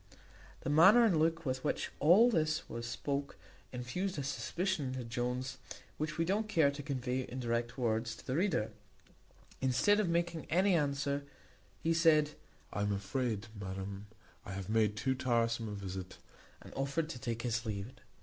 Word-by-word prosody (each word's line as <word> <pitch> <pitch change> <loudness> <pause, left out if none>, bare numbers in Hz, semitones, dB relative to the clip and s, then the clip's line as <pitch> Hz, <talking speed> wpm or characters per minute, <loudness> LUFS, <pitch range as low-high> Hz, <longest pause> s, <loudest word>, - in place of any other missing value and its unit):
The - - -3
manner 190 +10 +8
and 180 -8 +3
look 165 +1 +1
with 130 -1 -2
which - - -1
all 200 +11 +6
this 155 -5 +1
was 115 0 -5
spoke 140 +4 -3 0.3
infused 155 +10 -3
a 140 - -2
suspicion 170 +3 -1
into 130 0 -4
Jones 125 +2 -3 0.4
which 155 0 -2
we 165 - +2
don't 210 +4 0
care 160 -8 +4
to 140 +1 -6
convey 130 -3 -2
in 130 0 -6
direct 120 0 -1
words 115 -2 0
to - - -14
the 130 - -1
reader. 170 - +1 0.9
Instead 135 - +3
of 205 -5 +1
making 170 -1 0
any 190 +4 +4
answer, 140 -2 0 0.6
he 165 - +3
said, 155 -3 +4 0.4
"I 105 - -2
am 105 0 +1
afraid, 105 +2 -1
madam, 100 +1 -6 0.4
I 100 - -7
have 95 0 -5
made 110 -1 +2
too 130 +3 +1
tiresome 115 -3 0
a - - -5
visit;" 95 -2 -6 0.5
and - - -12
offered 140 +4 -1
to 130 - -6
take 115 -2 -3
his 120 -1 0
leave. 100 +2 -3
130 Hz, 170 wpm, -34 LUFS, 115-160 Hz, 0.9 s, manner